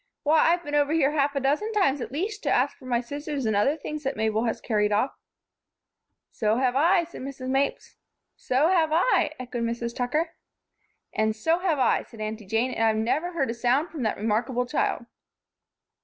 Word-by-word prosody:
Why! 310 +1 +4
I've 345 0 0
been 290 - -7
over 290 +1 +2
here 295 -3 +3
half 285 -1 +1
a - - +1
dozen 295 +11 0
times 290 -10 +2
at - - -5
least 405 +9 -3
to - - -1
ask - - +2
for 265 - -16
my 240 -1 +1
scissors 285 +1 -4
and 220 -1 +1
other 275 +10 +2
things 305 0 -6
that 270 -1 -3
Mabel 220 +1 0
has 225 - -1
carried 210 -2 0
off." 215 +6 +1 1.2
"So 215 0 0
have 255 -1 +1
I," 340 +5 +4
said 340 - -10
Mrs. 260 -1 -6
Mapes. 270 +1 -1 0.4
"So 270 +6 +1
have 335 -4 +3
I," 345 +10 +2
echoed 245 -1 -5
Mrs. 235 0 -3
Tucker. 300 +7 -1 0.8
"And 215 0 +1
so 325 +10 +1
have 355 -5 +1
I," 260 - +3
added 230 - -13
Aunty 215 -1 -5
Jane, 225 +5 0
"and 225 - -1
I've 220 -1 +3
never 290 +11 0
heard 275 -7 0
a - - -3
sound 250 +7 +1
from 310 - -6
that 220 -3 -1
remarkable 230 +4 0
child." 250 -2 -1
265 Hz, 200 wpm, -26 LUFS, 230-305 Hz, 1.2 s, Why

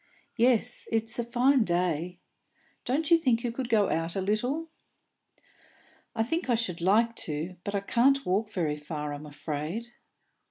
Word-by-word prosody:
"Yes, 245 0 +2
it's 225 +1 +2
a - - +1
fine 250 +2 +3
day. 175 -2 -1 0.7
Don't 300 +6 0
you 335 - +7
think 245 -7 +1
you 240 - -1
could 245 +1 -4
go 210 -4 +3
out 165 +1 -1
a - - 0
little?" 245 +11 -1 1.5
"I 225 - +2
think 325 +5 -2
I 240 - +4
should 185 -7 -3
like 225 +6 +3
to, 160 +4 -4
but 200 - -3
I 200 - 0
can't 270 +7 +2
walk 200 +4 0
very 155 -6 -1
far, 150 0 -5
I'm 145 +1 -8
afraid." 155 +10 -5
220 Hz, 160 wpm, -28 LUFS, 170-240 Hz, 1.5 s, you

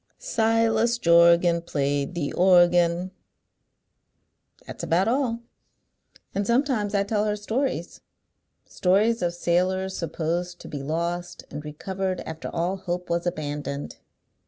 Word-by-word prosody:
Silas 225 - +1
Jorgan 170 -2 +5
Played 145 -1 -1
the 150 -5 -2
organ. 175 0 +4 1.5
That's - - -8
about 180 +5 +1
all. 240 -1 0 0.9
And 200 0 -1
sometimes 235 -5 +1
I 200 - +3
tell 210 +1 0
her 210 -1 0
stories, 225 +6 -3 0.6
stories 210 +5 +2
of 175 -1 -1
sailors 185 +2 0
supposed 170 +2 -3
to - - -10
be 145 - -6
lost, 170 +4 -3
and 150 +1 -6
recovered 185 +5 -4
after 160 0 -6
all 175 +3 -1
hope 180 -2 -4
was 170 +1 0
abandoned." 145 -4 -4
180 Hz, 115 wpm, -25 LUFS, 170-205 Hz, 1.5 s, Jorgan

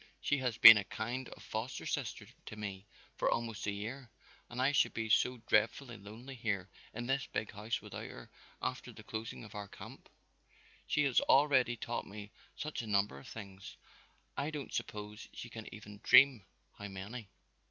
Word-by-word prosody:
"She 145 - +1
has 125 -4 -1
been 115 -2 +12
a 105 - 0
kind 120 +6 -4
of - - -12
foster 110 +4 -4
sister - - -3 0.2
to - - -6
me 100 -1 -6 0.3
for - - +2
almost 115 -3 -2
a - - +2
year 120 +6 -6 0.4
and 120 - -6
I 130 +2 +4
should 145 - +3
be 110 -1 -2
so 125 +3 +3
dreadfully 120 +3 +2
lonely 110 +6 -10
here 105 -6 -2 0.2
in 120 +2 -5
this 135 +2 0
big 110 - -3
house 105 +2 -3
without - - -7
her - - -11 0.3
after - - -3
the - - -12
closing 110 +1 -6
of 105 - -11
our 105 -1 -5
camp. - - -12 0.8
She 145 - +2
has 135 -4 +4
already 135 -4 +4
taught 120 +1 -4
me 105 0 -9 0.2
such 155 -3 -4
a 115 - -8
number 100 -8 +1
of - - -13
things, 100 -3 -9 0.6
I 140 +2 -1
don't 150 -3 -6
suppose 105 0 -5
she 120 - -7
can 110 -1 -8
even 105 -1 -10
dream 130 -6 +7 0.3
how 100 - -5
many! 100 +3 -7
110 Hz, 180 wpm, -34 LUFS, 105-125 Hz, 0.8 s, been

